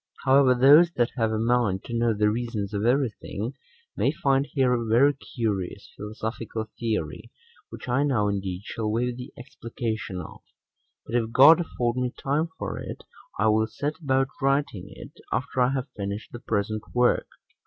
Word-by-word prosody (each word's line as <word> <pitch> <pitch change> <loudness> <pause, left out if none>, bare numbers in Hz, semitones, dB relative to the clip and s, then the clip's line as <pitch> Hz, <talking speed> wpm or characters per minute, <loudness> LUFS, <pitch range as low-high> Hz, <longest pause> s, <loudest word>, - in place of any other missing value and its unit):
However, 135 -1 +5
those 145 +7 +7
that 120 0 +1
have 115 -3 +1
a 110 - 0
mind 115 -4 +1
to 120 - -8
know 115 0 +2
the 105 0 +2
reasons 110 -3 -3
of 105 +2 0
every 130 -1 +2
thing, 110 +6 -5 0.4
may - - +2
find 135 0 +1
here 130 -3 +2
a 120 -1 0
very 120 +6 +4
curious 105 -8 -4
philosophical 110 +1 -5
theory, 110 -10 -3 0.4
which - - -10
I 125 +3 +2
now 125 -8 +2
indeed 95 -2 -3
shall 110 -2 -3
wave 120 +2 0
the 125 0 -8
explication 115 -5 -5
of; 80 - -9 0.6
but - - -9
if 115 -2 0
God 155 +7 +8
afford 125 -7 -2
me 125 -1 0
time 150 +4 0
for - - -4
it, - - -7 0.3
I 110 +2 +3
will 110 +1 +3
set 145 +7 -4
about 135 -2 +1
writing 135 -8 0
it 100 - -11
6 - - -16
after 130 - -1
I 125 - +4
have 135 0 -2
finished 100 +1 -5
the 120 - -8
present 110 -1 -2
work. 125 0 +3
120 Hz, 175 wpm, -26 LUFS, 110-130 Hz, 0.6 s, God